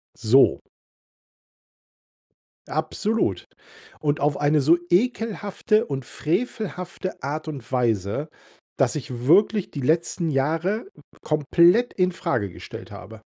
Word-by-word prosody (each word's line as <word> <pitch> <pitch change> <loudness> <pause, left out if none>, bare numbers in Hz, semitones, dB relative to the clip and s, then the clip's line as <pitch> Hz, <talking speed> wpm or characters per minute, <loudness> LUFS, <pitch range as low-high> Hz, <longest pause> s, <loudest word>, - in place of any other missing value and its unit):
So. 120 +4 +4 2.1
Absolut. 155 - -1 0.5
Und 150 0 0
auf 145 0 +1
eine 145 +1 +2
so 160 +6 +5
ekelhafte 215 +1 +1
und 135 -3 -4
frevelhafte 185 - -3
Art 155 +3 -4
und 140 -6 -7
Weise, 120 - 0 0.5
dass 135 -1 +2
ich 125 -4 -5
wirklich 200 +5 +3
die 140 - -5
letzten 165 +4 0
Jahre 165 - 0 0.4
komplett 170 - +3
infrage 175 - 0
gestellt 85 - -10
habe. 110 -1 -11
155 Hz, 100 wpm, -24 LUFS, 135-185 Hz, 2.1 s, so